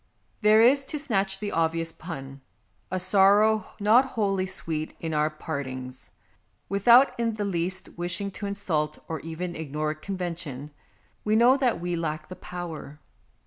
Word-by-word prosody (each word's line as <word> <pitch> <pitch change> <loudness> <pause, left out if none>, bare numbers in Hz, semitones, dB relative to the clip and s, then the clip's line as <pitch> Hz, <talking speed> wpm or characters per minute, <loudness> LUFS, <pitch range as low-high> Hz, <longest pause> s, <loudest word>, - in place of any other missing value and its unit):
There 215 +1 +6
is, 275 +4 +5
to 300 - -3
snatch 200 -9 0
the 205 0 -4
obvious 165 0 0
pun, 135 -6 -8 0.5
a 185 - -2
sorrow 200 +3 +4
not 215 +5 +5
wholly 200 -7 -1
sweet 160 -4 -4
in 160 -1 -4
our 150 0 +2
part 155 -2 -5
ings. 130 0 -8 0.6
Without 235 +7 +6
in 230 -2 0
the 210 -1 -2
least 185 0 -1
wishing 175 +3 -2
to 200 +1 -6
insult 155 -7 -1
or 160 -1 -4
even 170 +2 -5
ignore 155 0 -3
convention, 165 -5 -5 0.5
we 215 0 +2
know 240 +4 +6
that 255 -8 +1
we 175 0 -2
lack 155 -2 -4
the 185 - -7
power. 170 -5 -8
180 Hz, 150 wpm, -26 LUFS, 155-205 Hz, 0.6 s, There